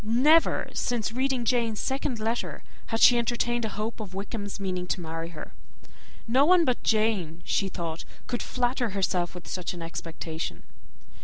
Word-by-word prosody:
Never 265 +9 +4
since 235 -3 -1
reading 260 0 0
Jane's 230 -3 +1
second 265 -2 -1
letter 225 +2 -2 0.2
had 225 0 -1
she 240 -1 +8
entertained 240 0 0
a - - -2
hope 220 +2 -3
of 195 -4 -7
Wickham's 205 +1 -4
meaning 185 -2 -2
to 185 - -1
marry 165 0 -5
her. 165 -3 -9 0.7
No 255 +4 +5
one 350 +2 +6
but 250 -3 +1
Jane, 205 -7 +1
she 195 - +1
thought, 165 -3 -4 0.2
could 245 - -2
flatter 245 -4 0
herself 180 -2 0
with 180 - -9
such 180 -1 -3
an 170 - -6
expectation. 165 -1 -5
220 Hz, 160 wpm, -27 LUFS, 180-240 Hz, 0.7 s, she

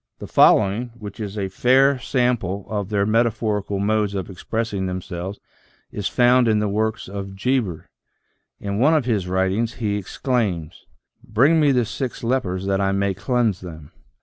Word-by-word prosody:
The - - -8
following, 110 +4 +4
which 105 -2 -9
is 105 -1 -5
a 100 -2 -1
fair 130 +7 +3
sample 120 -7 -1
of 105 -3 -3
their 100 -2 +1
metaphorical 110 -2 0
modes 105 0 0
of 95 -1 -4
expressing 100 +1 -3
them 90 0 -3
selves, 90 +3 -6 0.5
is 100 - -3
found 125 0 +4
in 110 -1 +3
the 105 0 +1
works 110 +2 -1
of 95 0 -6
Geber. 105 -5 -1 0.7
In 100 0 -3
one 150 +6 +4
of 150 -6 +1
his 105 -7 0
writ 95 +1 +1
ings, 115 +4 -1
he 105 -3 -1
exclaims: 95 - -2 0.2
" - - -55
Bring 140 +9 +3
me 150 -2 +4
the 125 -3 +2
six 120 +3 -5
lepers 100 -7 -1
that 100 0 0
I 95 0 +1
may 100 0 0
cleanse 110 0 0
them." 80 -5 -10
105 Hz, 175 wpm, -22 LUFS, 95-120 Hz, 0.7 s, following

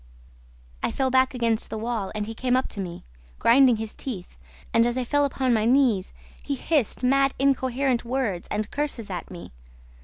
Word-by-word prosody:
"I - - 0
fell 265 -1 0
back 260 0 +3
against 230 -2 0
the - - -4
wall 220 -3 -3
and 210 -1 -2
he 225 - -6
came 250 +2 +1
up 260 - 0
to - - -7
me, 175 -3 -6 0.3
grinding 255 0 +5
his 220 0 -5
teeth, 205 - -7 0.4
and, 230 - +5
as 240 +1 -1
I 255 - 0
fell 290 +4 +2
upon 260 -2 0
my 220 -1 +2
knees, 240 -6 +3 0.3
he 285 - -3
hissed 275 -4 0
mad, 275 +1 +3
incoherent 260 -2 +1
words 235 -8 -2
and 210 0 -3
curses 280 -8 -3
at 175 -3 -5
me. 175 -2 -10
245 Hz, 185 wpm, -25 LUFS, 215-265 Hz, 0.4 s, grinding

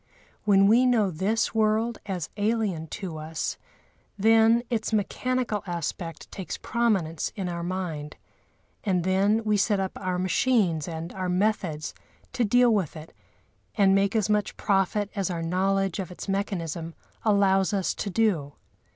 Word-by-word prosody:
When 195 -1 +5
we 235 +5 +5
know 220 -6 +3
this 200 +7 0
world 220 +1 +1
as 180 -5 -4
alien 205 -6 -1
to 175 -1 -6
us, 155 +1 -4 0.6
then 225 +3 +5
its 220 -2 -1
mechanical 225 +1 -1
aspect 170 0 -5
takes 190 - -5
prominence 195 -10 0
in 195 -3 -3
our 170 -1 -3
mind; 170 -4 -4 0.7
and 185 -5 +1
then 200 +4 +2
we 210 -1 +2
set 205 0 +2
up 190 -1 -1
our 185 -1 -1
machines 185 - +1
and 165 0 -6
our 185 -1 -3
methods 180 -5 0 0.4
to 255 -2 +1
deal 245 +2 +4
with 190 -8 -1
it 155 0 -10 0.6
and 195 -3 +4
make 195 +2 +2
as 220 -2 +2
much 210 -1 0
profit 200 +1 +1
as 195 -3 -1
our 170 -2 -3
knowledge 195 +2 0
of 190 - -4
its 180 - -8
mechanism 170 -5 -3 0.3
allows 195 -2 +3
us 195 -3 0
to 205 - -4
do. 180 -9 +1
195 Hz, 150 wpm, -26 LUFS, 175-215 Hz, 0.7 s, When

